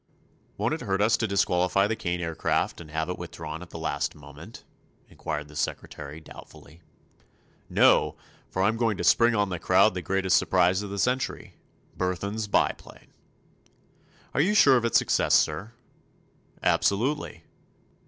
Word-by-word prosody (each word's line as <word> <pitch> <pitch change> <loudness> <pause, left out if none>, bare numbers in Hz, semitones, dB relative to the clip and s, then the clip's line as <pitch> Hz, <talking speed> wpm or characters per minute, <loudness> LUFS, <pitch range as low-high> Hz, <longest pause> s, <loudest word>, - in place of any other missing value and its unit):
"Won't - - 0
it - - -4
hurt 95 0 -1
us 110 +2 +3
to 110 - -1
disqualify 95 -1 +2
the 110 +2 -1
Kane 90 -3 -3
Aircraft 80 0 -1
and 80 - -12
have 80 +1 -2
it 90 - -5
withdrawn 75 +2 -7
at 90 - -11
the - - -9
last 80 - -2
moment?" 75 +8 -13 0.4
inquired 75 0 -5
the 75 - -15
secretary, 75 0 -5
doubtfully. 80 +1 -15 0.9
"No; - - +4 0.3
for 95 - -1
I'm 110 +3 +1
going 115 -4 0
to - - -4
spring 120 0 +4
on 105 -2 +1
the 90 -2 -4
crowd 95 +4 +4
the 90 - -4
biggest 95 0 +1
surprise 95 +1 +2
of 105 - -6
the 100 - -5
century—Burthon's 105 -4 -3
Biplane." 100 - -2 1.2
"Are - - +2
you 200 +7 +1
sure 140 -9 +6
of 120 -2 +1
its 115 - +3
success, - - +2
sir?" 95 +10 0 0.9
"Absolutely. 130 +9 0
95 Hz, 150 wpm, -26 LUFS, 85-110 Hz, 1.2 s, sure